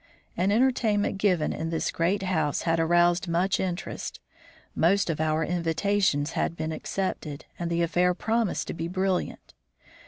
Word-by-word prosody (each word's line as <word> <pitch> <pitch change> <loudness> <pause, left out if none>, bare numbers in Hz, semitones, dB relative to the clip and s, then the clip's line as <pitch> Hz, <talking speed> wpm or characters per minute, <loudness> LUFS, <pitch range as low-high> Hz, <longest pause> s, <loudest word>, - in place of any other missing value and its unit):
An 185 +3 +1
entertainment 220 -4 +2
given 180 -6 +2
in 165 - -3
this 165 -1 -1
great 185 +4 0
house 160 -6 0
had 165 -1 +1
aroused 175 +2 +3
much 180 +3 +1
interest. 185 +1 -4 0.6
Most 180 +2 +3
of 155 - -3
our 155 0 +1
invitations 170 -2 +1
had - - -1
been 155 0 -2
accepted, 155 -3 -4
and 170 -1 -2
the 170 0 +1
affair 180 +2 +2
promised 225 0 0
to - - -2
be 165 0 -4
brilliant. 185 +1 -2
175 Hz, 150 wpm, -27 LUFS, 165-195 Hz, 0.6 s, aroused